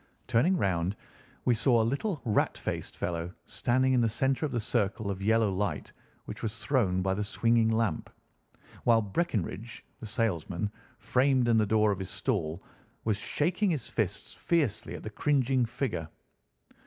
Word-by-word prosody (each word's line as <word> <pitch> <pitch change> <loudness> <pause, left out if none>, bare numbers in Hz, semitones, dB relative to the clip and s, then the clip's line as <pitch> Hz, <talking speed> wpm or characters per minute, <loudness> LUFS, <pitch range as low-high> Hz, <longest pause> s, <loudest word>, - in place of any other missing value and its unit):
Turning 170 +11 +3
round 95 - 0 0.5
we 125 - +4
saw 120 +1 +3
a - - +4
little 140 - -1
rat 110 -3 +1
faced - - -4
fellow 85 0 -3
standing 130 +1 +1
in 125 - +4
the 115 - +3
centre 135 +6 +1
of - - -9
the 120 - 0
circle 110 -2 -1
of 95 0 -5
yellow 110 0 +3
light 100 +2 -2 0.3
which - - -7
was 110 0 -3
thrown 105 -5 +1
by 95 0 +1
the 105 +2 -1
swinging 115 +2 +2
lamp, 115 -1 0 0.7
while 115 -2 +4
Breckinridge, 110 - -3
the 110 - -7
salesman, 100 -4 -1 0.3
framed 125 +1 +2
in 115 -1 +4
the 105 - +2
door 110 0 +3
of 100 - -2
his 95 - -4
stall, 80 +3 -2 0.4
was 110 -2 +1
shaking 180 - 0
his 150 -8 -2
fists 100 -3 -2
fiercely 150 - 0
at - - -8
the - - -4
cringing 130 -1 +2
figure. 120 - -3
115 Hz, 165 wpm, -29 LUFS, 100-130 Hz, 0.7 s, we